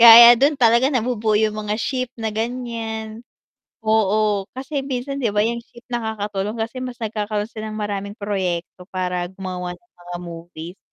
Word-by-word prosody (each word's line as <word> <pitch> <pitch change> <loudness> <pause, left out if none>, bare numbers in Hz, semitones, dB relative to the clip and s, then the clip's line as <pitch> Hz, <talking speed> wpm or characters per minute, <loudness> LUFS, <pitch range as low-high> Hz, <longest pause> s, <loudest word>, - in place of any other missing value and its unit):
Kaya 235 +1 +12
'yan - - +4
dun 285 +3 +5
talaga 235 +2 +5
nabubuo 225 -5 +1
'yung 215 0 +3
mga 210 0 -1
ship 255 +2 -1
na 220 -2 -2
ganiyan, 225 -1 -3 0.6
oo, 215 -2 +3
kasi 275 +2 -2
minsan, 275 +1 -3
'di 235 - +2
ba, - - +5
'yung 235 +1 -1
ship 235 0 -17
nakakatulong 210 -2 -2
kasi 230 +3 -3
mas 250 -1 -5
nagkakaroon 210 -1 -1
sila 215 -1 -6
ng - - -5
maraming 200 0 -3
proyekto 185 -3 -2
para 180 -1 -1
gumawa 185 -1 -5
ng 235 +6 -34
mga 175 0 -6
movies. 170 +1 -8
220 Hz, 165 wpm, -22 LUFS, 200-235 Hz, 0.6 s, Kaya